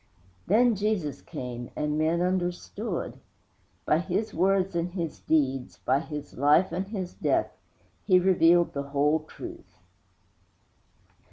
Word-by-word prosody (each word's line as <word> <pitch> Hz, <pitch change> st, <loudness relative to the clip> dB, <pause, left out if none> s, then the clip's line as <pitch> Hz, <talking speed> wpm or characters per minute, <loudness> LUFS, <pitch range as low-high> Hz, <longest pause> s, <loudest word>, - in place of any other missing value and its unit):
Then 235 Hz, +5 st, +4 dB
Jesus 195 Hz, -9 st, -1 dB
came, 120 Hz, -1 st, -6 dB
and 150 Hz, 0 st, -1 dB
men 160 Hz, +2 st, +1 dB
understood. 180 Hz, +2 st, -2 dB, 0.7 s
By 155 Hz, -, +3 dB
His 185 Hz, +5 st, -2 dB
words 190 Hz, +1 st, +2 dB
and 170 Hz, +1 st, -1 dB
His 170 Hz, -4 st, -4 dB
deeds, 135 Hz, -5 st, 0 dB
by 130 Hz, +2 st, +1 dB
His 150 Hz, -2 st, -7 dB
life 150 Hz, +6 st, +4 dB
and 190 Hz, +2 st, -3 dB
His 190 Hz, -4 st, -5 dB
death, -, -, 0 dB, 0.5 s
He 185 Hz, -3 st, +5 dB
revealed 175 Hz, -2 st, +4 dB
the 140 Hz, -, -2 dB
whole 145 Hz, +2 st, +2 dB
truth. 340 Hz, -, -11 dB
170 Hz, 120 wpm, -27 LUFS, 150-190 Hz, 0.7 s, He